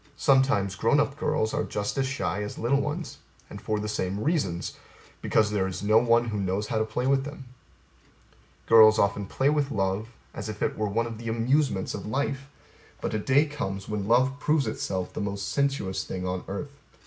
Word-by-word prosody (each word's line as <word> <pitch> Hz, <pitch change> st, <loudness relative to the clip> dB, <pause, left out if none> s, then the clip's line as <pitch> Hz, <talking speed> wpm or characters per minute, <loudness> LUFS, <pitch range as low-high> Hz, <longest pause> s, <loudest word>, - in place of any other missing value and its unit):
Sometimes 130 Hz, -8 st, +3 dB
grown 115 Hz, +8 st, +2 dB
up 140 Hz, -1 st, +1 dB
girls 110 Hz, -7 st, 0 dB
are -, -, 0 dB
just 105 Hz, 0 st, -3 dB
as 135 Hz, -1 st, 0 dB
shy 130 Hz, -7 st, -2 dB
as 105 Hz, -, -5 dB
little 135 Hz, +5 st, +1 dB
ones 150 Hz, +4 st, -4 dB, 0.3 s
and -, -, -8 dB
for 110 Hz, -1 st, -1 dB
the 105 Hz, -, -3 dB
same 100 Hz, -2 st, -2 dB
reasons 105 Hz, -, -1 dB, 0.5 s
because 105 Hz, -1 st, +2 dB
there 100 Hz, -3 st, +1 dB
is 95 Hz, +1 st, -5 dB
no 110 Hz, +2 st, +5 dB
one 120 Hz, 0 st, +3 dB
who 105 Hz, -2 st, -2 dB
knows 100 Hz, +2 st, -1 dB
how 110 Hz, -, 0 dB
to 110 Hz, -, +1 dB
play 110 Hz, +3 st, -3 dB
with 135 Hz, 0 st, +3 dB
them. 145 Hz, -1 st, -8 dB, 1.2 s
Girls 110 Hz, -1 st, +7 dB
often 100 Hz, 0 st, +1 dB
play 135 Hz, +7 st, +1 dB
with 145 Hz, -2 st, +1 dB
love 100 Hz, -2 st, -1 dB, 0.3 s
as 105 Hz, -, -6 dB
if 105 Hz, -1 st, -4 dB
it -, -, 0 dB
were 105 Hz, -1 st, -1 dB
one 115 Hz, +3 st, 0 dB
of 115 Hz, -2 st, -6 dB
the 115 Hz, 0 st, -5 dB
amusements 120 Hz, -2 st, +1 dB
of 105 Hz, -, -6 dB
life; 135 Hz, +3 st, -2 dB, 0.5 s
but -, -, -3 dB
a 110 Hz, -, 0 dB
day 135 Hz, +7 st, +3 dB
comes 100 Hz, -10 st, -5 dB
when 105 Hz, -2 st, -3 dB
love 130 Hz, +4 st, +3 dB
proves 150 Hz, -2 st, +2 dB
itself 95 Hz, -4 st, -3 dB
the -, -, -4 dB
most 100 Hz, -1 st, -3 dB
sensuous 120 Hz, -9 st, 0 dB
thing 90 Hz, -1 st, -5 dB
on 90 Hz, 0 st, -3 dB
earth. 140 Hz, +8 st, -6 dB
110 Hz, 200 wpm, -27 LUFS, 100-135 Hz, 1.2 s, Girls